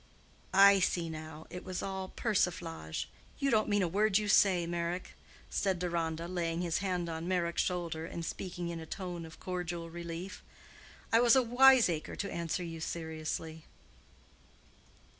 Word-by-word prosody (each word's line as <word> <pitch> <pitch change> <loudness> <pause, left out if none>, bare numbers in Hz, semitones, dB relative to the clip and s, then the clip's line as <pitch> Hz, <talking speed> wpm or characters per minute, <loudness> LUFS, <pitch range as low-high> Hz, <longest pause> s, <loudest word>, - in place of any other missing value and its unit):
"I 200 0 +8
see 170 -2 0
now; 155 0 -8
it 180 +1 -6
was 185 -1 -4
all 190 -1 -3
persiflage. 170 - -1 0.3
You 275 0 +1
don't 215 -2 +3
mean 205 -1 +3
a - - +2
word 200 +3 +3
you 210 -1 -1
say, 185 -4 +5
Meyrick," 170 +1 -3 0.4
said 190 -2 +1
Deronda, 170 -2 -2
laying 170 -1 -2
his 170 -2 0
hand 180 -3 -1
on 165 +1 -4
Meyrick's 175 -2 +1
shoulder, 170 -3 -2
and 170 0 -5
speaking 175 -1 -4
in 170 -1 -4
a 160 - -8
tone 175 -3 -5
of 160 - -14
cordial 175 -2 -4
relief. 170 +2 -6 0.7
"I 225 - +7
was 240 0 +6
a 260 - +5
wiseacre 245 -9 +5
to 200 - -4
answer 170 +1 -2
you 165 -1 -6
seriously." 160 -1 -4
175 Hz, 155 wpm, -32 LUFS, 165-190 Hz, 0.7 s, I